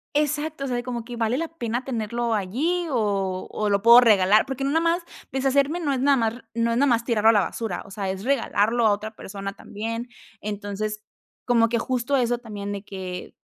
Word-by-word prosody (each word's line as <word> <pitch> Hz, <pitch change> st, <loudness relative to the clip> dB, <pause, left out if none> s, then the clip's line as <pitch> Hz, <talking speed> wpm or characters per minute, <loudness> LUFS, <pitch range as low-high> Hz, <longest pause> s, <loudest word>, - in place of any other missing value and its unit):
Exacto, 295 Hz, 0 st, 0 dB
o -, -, -3 dB
sea, 250 Hz, -, -1 dB
de 240 Hz, -, -2 dB
como 240 Hz, -2 st, -4 dB
que, 245 Hz, -, -7 dB
¿vale 230 Hz, +2 st, 0 dB
la 330 Hz, +1 st, -1 dB
pena 245 Hz, -5 st, -4 dB
tenerlo 235 Hz, -1 st, -2 dB
allí 275 Hz, -, 0 dB
o 200 Hz, -7 st, -1 dB
o 210 Hz, -1 st, -1 dB
lo 200 Hz, -1 st, +2 dB
puedo 235 Hz, +2 st, +9 dB
regalar? 210 Hz, -2 st, +5 dB
Porque 270 Hz, 0 st, -3 dB
no 275 Hz, -, 0 dB
nada 325 Hz, +2 st, +2 dB
más 335 Hz, +1 st, +1 dB, 0.3 s
deshacerme, 275 Hz, +5 st, +1 dB
no 290 Hz, -5 st, 0 dB
es 255 Hz, -, -1 dB
nada 275 Hz, 0 st, +4 dB
más 225 Hz, -1 st, +1 dB
r 245 Hz, -, -12 dB
no 230 Hz, 0 st, +1 dB
es 230 Hz, -, 0 dB
nada 280 Hz, +3 st, +4 dB
más 235 Hz, -2 st, +2 dB
tirarlo 225 Hz, -2 st, +3 dB
a -, -, +9 dB
la 210 Hz, -, +4 dB
basura, 205 Hz, 0 st, -3 dB
o 195 Hz, -, -14 dB
sea, 195 Hz, -1 st, -3 dB
es 190 Hz, +2 st, -4 dB
regalarlo 235 Hz, -3 st, +2 dB
a -, -, +4 dB
otra 215 Hz, +2 st, -3 dB
persona 195 Hz, -1 st, -6 dB
también. 230 Hz, +4 st, -5 dB, 0.3 s
Entonces, 210 Hz, +1 st, -4 dB, 0.4 s
como 230 Hz, -2 st, +3 dB
que 235 Hz, 0 st, +1 dB
justo 255 Hz, +2 st, 0 dB
eso 245 Hz, -1 st, +1 dB
también 205 Hz, -3 st, -6 dB
de 200 Hz, -, -6 dB
que, 185 Hz, -3 st, -7 dB
230 Hz, 225 wpm, -24 LUFS, 210-265 Hz, 0.4 s, puedo